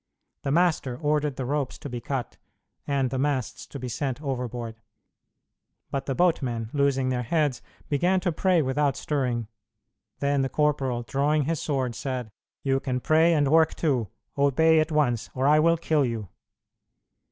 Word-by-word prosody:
The 140 Hz, -, -3 dB
master 155 Hz, -6 st, +2 dB
ordered 150 Hz, 0 st, 0 dB
the 130 Hz, -, -4 dB
ropes 140 Hz, 0 st, -2 dB
to -, -, -8 dB
be 120 Hz, -3 st, -5 dB
cut 135 Hz, -2 st, -4 dB, 0.5 s
and 135 Hz, -3 st, 0 dB
the 130 Hz, -, -1 dB
masts 135 Hz, -3 st, -1 dB
to -, -, -8 dB
be 130 Hz, -1 st, -5 dB
sent 125 Hz, +2 st, -3 dB
overboard: 120 Hz, -5 st, -4 dB, 1.1 s
but 140 Hz, -, -3 dB
the 135 Hz, -, -1 dB
boatmen, 125 Hz, -10 st, +1 dB
losing 140 Hz, -2 st, +2 dB
their 125 Hz, -1 st, 0 dB
heads, 145 Hz, +1 st, 0 dB, 0.3 s
began 175 Hz, +6 st, +2 dB
to 180 Hz, -, 0 dB
pray 175 Hz, 0 st, +2 dB
without 135 Hz, +1 st, +1 dB
stirring. 125 Hz, -7 st, -1 dB, 0.7 s
Then 140 Hz, 0 st, +1 dB
the 135 Hz, -, 0 dB
corporal, 135 Hz, -5 st, 0 dB
drawing 145 Hz, +4 st, +1 dB
his 160 Hz, +2 st, -1 dB
sword, 130 Hz, -5 st, -1 dB
said, 125 Hz, -1 st, -4 dB, 0.3 s
"You 135 Hz, -1 st, +2 dB
can 130 Hz, -2 st, -2 dB
pray 160 Hz, +5 st, +4 dB
and 145 Hz, -2 st, +3 dB
work 160 Hz, 0 st, +4 dB
too; 130 Hz, -9 st, 0 dB, 0.3 s
obey 155 Hz, +3 st, +4 dB
at 155 Hz, +1 st, 0 dB
once, 125 Hz, -7 st, +1 dB
or 130 Hz, +1 st, 0 dB
I 150 Hz, +2 st, +6 dB
will 165 Hz, +2 st, +4 dB
kill 155 Hz, -2 st, +1 dB
you." 115 Hz, -6 st, -3 dB
140 Hz, 165 wpm, -26 LUFS, 125-150 Hz, 1.1 s, I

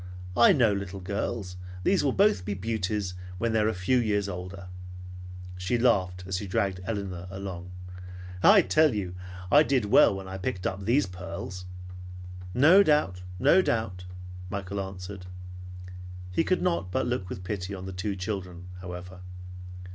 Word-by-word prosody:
I 120 Hz, -, +7 dB
know 115 Hz, -7 st, +4 dB
little 100 Hz, -1 st, -4 dB
girls. 95 Hz, 0 st, -3 dB, 0.3 s
These 195 Hz, -4 st, +3 dB
will 140 Hz, -, +2 dB
both 195 Hz, -, +3 dB
be 100 Hz, +2 st, -3 dB
beauties 100 Hz, -1 st, -2 dB, 0.2 s
when 115 Hz, +3 st, 0 dB
they 110 Hz, -, +3 dB
are 105 Hz, -, +3 dB
a 110 Hz, -, +1 dB
few 90 Hz, +8 st, +2 dB
years 105 Hz, -3 st, +1 dB
older." 90 Hz, +1 st, -7 dB, 0.9 s
She 95 Hz, +7 st, 0 dB
laughed 95 Hz, -7 st, +2 dB
as 95 Hz, 0 st, -2 dB
she 100 Hz, -, -5 dB
dragged 95 Hz, 0 st, 0 dB
Elinor 95 Hz, -5 st, -4 dB
along. 95 Hz, -2 st, -6 dB, 0.7 s
"I 200 Hz, -, +7 dB
tell 155 Hz, -7 st, +3 dB
you 95 Hz, -4 st, -3 dB, 0.4 s
I 145 Hz, -, +8 dB
did 135 Hz, -7 st, +2 dB
well 100 Hz, -1 st, +6 dB
when 95 Hz, -1 st, -7 dB
I 95 Hz, 0 st, -6 dB
picked 90 Hz, -1 st, -3 dB
up 95 Hz, +1 st, -2 dB
these 125 Hz, +7 st, +3 dB
pearls." 90 Hz, 0 st, -7 dB, 0.9 s
"No 160 Hz, +10 st, +7 dB
doubt; 150 Hz, -, +2 dB, 0.2 s
no 180 Hz, -, +5 dB
doubt!" 95 Hz, -, -2 dB, 0.4 s
Michael 100 Hz, +1 st, -3 dB
answered. 95 Hz, 0 st, -7 dB, 1.0 s
He 90 Hz, -, +2 dB
could 185 Hz, +2 st, +1 dB
not 170 Hz, -, 0 dB
but 130 Hz, -, 0 dB
look 110 Hz, -7 st, -2 dB
with 90 Hz, -, -6 dB
pity 100 Hz, 0 st, -4 dB
on 95 Hz, -1 st, -7 dB
the 95 Hz, -, -6 dB
two 100 Hz, +2 st, -3 dB
children 90 Hz, -2 st, -5 dB
however. 90 Hz, 0 st, -8 dB
100 Hz, 160 wpm, -27 LUFS, 90-115 Hz, 1.0 s, I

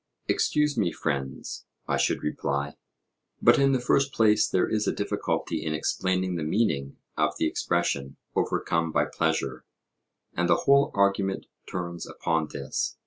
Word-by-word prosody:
Excuse 150 Hz, -4 st, +1 dB
me, 85 Hz, -5 st, +2 dB
friends, 70 Hz, -5 st, -4 dB, 0.2 s
I -, -, +1 dB
should -, -, +1 dB
reply; 70 Hz, -1 st, -2 dB, 0.6 s
but -, -, +5 dB
in 135 Hz, 0 st, +4 dB
the 130 Hz, -, +2 dB
first 135 Hz, +3 st, +2 dB
place 110 Hz, -3 st, +4 dB
there 95 Hz, -, +2 dB
is 105 Hz, -1 st, 0 dB
a -, -, +3 dB
difficulty -, -, -2 dB
in 75 Hz, -1 st, -1 dB
explaining 95 Hz, +2 st, 0 dB
the 80 Hz, -, -2 dB
meaning 75 Hz, -6 st, 0 dB, 0.2 s
of 75 Hz, 0 st, +1 dB
the -, -, +1 dB
expression 75 Hz, -4 st, -1 dB, 0.2 s
'overcome 85 Hz, -1 st, 0 dB
by -, -, +2 dB
pleasure'; 75 Hz, -5 st, -1 dB, 0.7 s
and 90 Hz, 0 st, 0 dB
the -, -, +3 dB
whole 140 Hz, +1 st, +5 dB
argument 100 Hz, -1 st, +1 dB, 0.3 s
turns 85 Hz, -1 st, -4 dB
upon 80 Hz, -2 st, -1 dB
this. 70 Hz, -2 st, -3 dB
85 Hz, 145 wpm, -27 LUFS, 75-105 Hz, 0.7 s, but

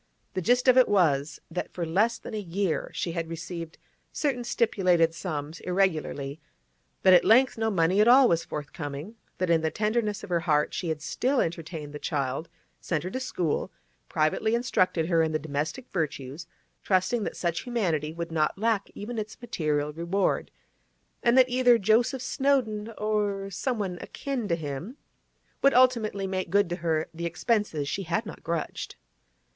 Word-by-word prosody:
The 185 Hz, -, -1 dB
gist 245 Hz, +7 st, +2 dB
of 255 Hz, 0 st, +7 dB
it 255 Hz, -, +5 dB
was 155 Hz, -8 st, +2 dB
that 180 Hz, -, -4 dB
for 175 Hz, -, -2 dB
less 210 Hz, +8 st, +2 dB
than -, -, -9 dB
a 215 Hz, -, -2 dB
year 190 Hz, -2 st, -1 dB
she 170 Hz, -, -3 dB
had 165 Hz, -1 st, -3 dB
received 165 Hz, 0 st, -6 dB, 0.3 s
certain 270 Hz, -5 st, -1 dB
stipulated 185 Hz, -8 st, +2 dB
sums 155 Hz, -2 st, -5 dB
irregularly; 160 Hz, -6 st, -1 dB, 0.6 s
that 185 Hz, -, +7 dB
at 180 Hz, -, +7 dB
length 250 Hz, +3 st, +5 dB
no 225 Hz, 0 st, 0 dB
money 185 Hz, 0 st, +3 dB
at 215 Hz, -, +4 dB
all 255 Hz, +2 st, +8 dB
was 170 Hz, -4 st, +2 dB
forthcoming; 145 Hz, +4 st, -6 dB, 0.2 s
that 185 Hz, -2 st, 0 dB
in 165 Hz, -1 st, +4 dB
the 160 Hz, -, +1 dB
tenderness 215 Hz, +1 st, -1 dB
of 190 Hz, -, -8 dB
her 170 Hz, -, +3 dB
heart 150 Hz, -3 st, +1 dB
she 175 Hz, -, -3 dB
had 155 Hz, -1 st, -3 dB
still 260 Hz, -, 0 dB
entertained 160 Hz, -3 st, -3 dB
the 150 Hz, -, -6 dB
child, 140 Hz, +2 st, -2 dB, 0.3 s
sent 160 Hz, -4 st, -2 dB
her 185 Hz, -, -4 dB
to 260 Hz, -, -3 dB
school, 180 Hz, -, -2 dB, 0.4 s
privately 160 Hz, +9 st, +1 dB
instructed 185 Hz, -8 st, +1 dB
her 165 Hz, -1 st, +3 dB
in 160 Hz, -1 st, 0 dB
the -, -, +3 dB
domestic 155 Hz, -, -3 dB
virtues, 155 Hz, -2 st, -3 dB, 0.3 s
trusting 190 Hz, +4 st, +1 dB
that -, -, -4 dB
such 170 Hz, -1 st, -1 dB
humanity 175 Hz, -, -1 dB
would 170 Hz, +1 st, -5 dB
not 155 Hz, +1 st, +1 dB
lack 215 Hz, -1 st, 0 dB
even 225 Hz, +2 st, -5 dB
its 215 Hz, 0 st, -6 dB
material 150 Hz, -10 st, -1 dB
reward, 170 Hz, +5 st, 0 dB, 0.7 s
and 240 Hz, +1 st, +3 dB
that 255 Hz, -1 st, +7 dB
either 245 Hz, -1 st, +4 dB
Joseph 235 Hz, +5 st, +2 dB
Snowdon 235 Hz, -7 st, 0 dB
or 205 Hz, -2 st, -1 dB
someone 195 Hz, -4 st, -2 dB
akin 265 Hz, -6 st, -4 dB
to 170 Hz, -, +1 dB
him 160 Hz, -, -6 dB, 0.6 s
would 275 Hz, -1 st, +4 dB
ultimately 230 Hz, -6 st, +3 dB
make 185 Hz, -2 st, -2 dB
good 200 Hz, 0 st, +3 dB
to 175 Hz, -, -1 dB
her 160 Hz, -3 st, 0 dB
the 170 Hz, +1 st, -3 dB
expenses 170 Hz, -3 st, 0 dB
she 195 Hz, -, -2 dB
had 185 Hz, +5 st, -1 dB
not -, -, -9 dB
grudged. 165 Hz, -2 st, -4 dB
185 Hz, 170 wpm, -27 LUFS, 160-220 Hz, 0.7 s, all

